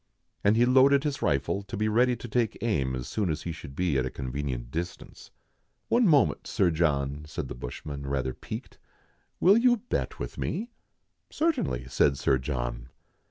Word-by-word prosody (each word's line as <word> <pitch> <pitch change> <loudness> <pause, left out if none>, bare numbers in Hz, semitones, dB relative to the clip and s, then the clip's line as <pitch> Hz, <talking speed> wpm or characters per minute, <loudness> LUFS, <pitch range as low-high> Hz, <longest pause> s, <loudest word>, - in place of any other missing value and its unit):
And 105 +2 +4
he 120 - +5
loaded 135 +2 +5
his 145 -3 -2
rifle, 70 +8 +1
to 100 +2 -7
be 110 +1 +1
ready 120 +3 +3
to 120 - -8
take 115 -1 0
aim 70 - 0
as 65 -1 -5
soon 105 -5 -1
as 80 0 -2
he 85 - -3
should 70 -4 -9
be 85 -5 +1
at 65 - 0
a - - -3
convenient 65 -2 -4
distance. 85 +3 -6 0.6
"One 235 -2 +4
moment, 150 -5 +3
Sir 95 -6 +2
John," 75 -3 0
said - - -5
the - - -4
bushman, 70 +3 -7
rather 65 -2 -1
piqued, - - -8 0.3
" - - -41
will 195 +5 +6
you 245 0 +4
bet 235 +3 -3
with - - -6
me 235 +4 -3 0.2
?'* - - -49
" - - -51
Certainly," 290 - 0
said 70 +2 +3
Sir 65 -1 +2
John. - - -4
85 Hz, 190 wpm, -28 LUFS, -, 0.6 s, will